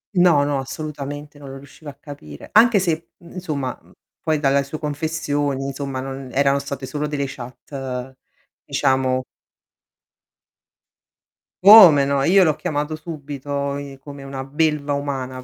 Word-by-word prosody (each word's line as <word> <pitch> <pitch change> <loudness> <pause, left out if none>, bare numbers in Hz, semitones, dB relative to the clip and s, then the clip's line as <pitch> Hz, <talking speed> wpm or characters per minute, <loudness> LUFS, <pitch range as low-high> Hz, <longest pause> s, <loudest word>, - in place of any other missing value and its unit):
No, 175 -5 +5
no, 145 -1 0
assolutamente, 145 +1 -7
non 140 - -10
lo 135 - -8
riuscivo 145 +2 -12
a - - -9
capire. 140 - -11
Anche 225 0 +6
se, 180 -2 +1
i 165 +1 -4 0.2
insomma 150 -9 -4
mhmm, - - -23 0.3
poi 155 -1 0
dalla 140 -1 +2
su 140 +3 -6
confessioni, 145 -2 -2
insomma, 135 -1 -4
non 135 0 -7
erano 140 0 +2
state 140 -1 -6
solo 150 +2 -3
delle 145 -1 -2
chat, 130 0 -7 0.5
diciamo 130 -1 +1 2.4
Come 185 -9 +9
no, 140 0 +1
io 190 +5 +5
l'ho 155 -4 +2
chiamato 150 +1 -3
subito, 145 -3 -5
i 140 -1 -8
come 140 0 -10
una 135 -1 -6
belva 150 +1 0
umana 135 -3 -4
140 Hz, 140 wpm, -21 LUFS, 135-150 Hz, 2.4 s, Come